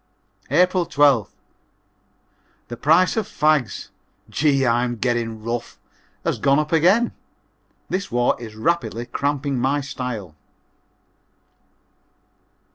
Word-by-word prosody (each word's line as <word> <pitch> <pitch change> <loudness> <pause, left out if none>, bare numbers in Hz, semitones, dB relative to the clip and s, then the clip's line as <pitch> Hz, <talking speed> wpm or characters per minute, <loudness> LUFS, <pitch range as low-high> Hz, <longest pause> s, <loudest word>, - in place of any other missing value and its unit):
April 180 +4 +3
12th. 140 -7 +3 1.4
The 120 - -5
price 160 +9 +3
of 220 -3 -1
fags 150 -8 0 0.4
(gee! 140 -3 +2
I'm 120 0 +1
getting 115 -2 -2
rough) 115 +1 -4 0.5
has - - -1
gone 140 0 +3
up 150 0 -1
again. 185 +9 +4 0.8
This 195 +2 -3
war 120 +1 +2
is 110 -2 -9
rapidly 120 -1 -1
cramping 140 +1 -2
my 135 +4 +1
style. 125 - -5
135 Hz, 100 wpm, -22 LUFS, 120-155 Hz, 1.4 s, again